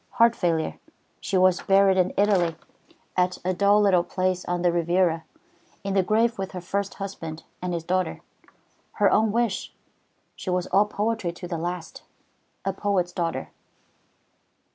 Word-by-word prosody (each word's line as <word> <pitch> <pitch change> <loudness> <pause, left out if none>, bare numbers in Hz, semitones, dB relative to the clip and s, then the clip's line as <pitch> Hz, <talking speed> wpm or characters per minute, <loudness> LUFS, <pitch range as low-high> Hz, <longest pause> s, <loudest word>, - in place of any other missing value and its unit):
Heart 230 0 +4
failure. 165 -3 -1 0.4
She 190 0 -1
was 185 -1 +4
buried 195 0 +4
in 185 -1 +2
Italy, 190 -5 +3 0.6
at 180 0 +1
a 185 - +1
dull 200 +3 +4
little 190 -4 +4
place 185 0 -1
on 175 0 -2
the 175 - +4
Riviera, 170 -1 +1 0.6
in 195 -1 -2
the 195 - +4
grave 225 +4 +1
with 190 0 -4
her 185 - -4
first 200 +3 -3
husband 165 -5 -6 0.2
and 180 0 -2
his 170 -2 -2
daughter. 185 +2 -1 0.7
Her - - +3
own 220 -1 +3
wish. 230 -3 -1 0.6
She - - -6
was 180 0 0
all 200 +3 +3
poetry 210 -3 -1
to 175 +1 -8
the 170 -2 -3
last, 175 0 -5 0.6
a 195 - 0
poet's 190 -3 0
daughter." 170 -1 -3
185 Hz, 155 wpm, -25 LUFS, 175-200 Hz, 0.7 s, Heart